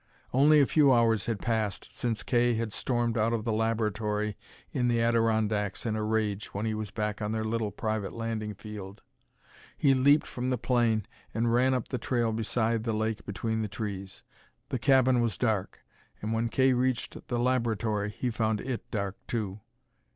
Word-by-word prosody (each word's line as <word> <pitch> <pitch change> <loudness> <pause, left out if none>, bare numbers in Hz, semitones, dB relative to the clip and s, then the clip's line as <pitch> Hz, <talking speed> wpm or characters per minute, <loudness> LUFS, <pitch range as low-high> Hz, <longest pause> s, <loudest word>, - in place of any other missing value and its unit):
Only 150 +4 +6
a 140 - +6
few 145 0 +4
hours 115 -4 +3
had 115 -3 -1
passed 110 -4 -1
since 115 -3 -2
Kay 120 -1 +2
had 110 -1 -2
stormed 120 +1 0
out 115 +2 +2
of 115 -2 -1
the 115 -1 -1
laboratory 105 -1 0 0.4
in 125 -1 +1
the 120 -1 +2
Adirondacks 110 -3 +1
in 110 -2 0
a 110 - -1
rage 105 -2 -1
when 100 +2 -1
he 110 - 0
was 110 -1 -4
back 105 0 -3
on 105 +1 -1
their 110 0 -1
little 110 -1 -1
private 110 0 -2
landing 110 -2 -3
field. 100 -1 -9 0.7
He 140 -2 +4
leaped 140 +3 +4
from 125 +1 -3
the 125 - +1
plane 115 -3 +1 0.3
and 115 +1 +1
ran 130 +2 +4
up 125 - -3
the 125 - -2
trail 120 -3 0
beside 115 0 0
the 115 -1 -1
lake 110 0 -2
between 110 +3 -2
the 110 - -1
trees. 100 -2 -6 0.5
The 130 - -2
cabin 130 -1 +4
was 115 -4 0
dark; 110 -6 -1 0.4
and, 110 +2 -3
when 115 +1 0
Kay 130 +3 +3
reached 125 -1 -1
the 120 - -1
laboratory 115 -4 0
he 120 +4 -3
found 110 -2 0
it 125 0 -5
dark 100 -3 -3
too. 105 -4 -3
115 Hz, 180 wpm, -29 LUFS, 105-120 Hz, 0.7 s, Only